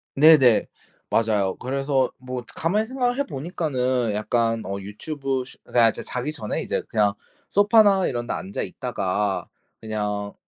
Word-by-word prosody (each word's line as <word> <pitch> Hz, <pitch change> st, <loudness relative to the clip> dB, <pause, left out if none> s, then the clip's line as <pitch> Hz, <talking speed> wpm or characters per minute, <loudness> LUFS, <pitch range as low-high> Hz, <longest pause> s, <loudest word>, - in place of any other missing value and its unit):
네네. 140 Hz, -6 st, +6 dB, 0.4 s
맞아요. 105 Hz, -4 st, +1 dB
그래서 135 Hz, 0 st, 0 dB
뭐 125 Hz, -1 st, -6 dB
가만히 205 Hz, +7 st, +1 dB
생각을 250 Hz, +1 st, -1 dB
해 280 Hz, -, +2 dB
보니까는 130 Hz, -, -1 dB
약간 115 Hz, +2 st, 0 dB
어 100 Hz, +1 st, -4 dB
유튜브 135 Hz, +6 st, -3 dB
스 -, -, -12 dB
그러니까 115 Hz, -2 st, +4 dB
이제 -, -, -5 dB
자기 125 Hz, +5 st, -3 dB
전에 110 Hz, -9 st, -3 dB
이제 -, -, -2 dB
그냥 105 Hz, -2 st, +2 dB, 0.4 s
소파나 205 Hz, -2 st, +5 dB
이런 120 Hz, -1 st, -3 dB
데 -, -, -1 dB
앉아 100 Hz, -, -4 dB
있다가 100 Hz, +1 st, -2 dB, 0.3 s
그냥 105 Hz, -2 st, -3 dB
125 Hz, 310 characters per minute, -24 LUFS, 105-155 Hz, 0.4 s, 네네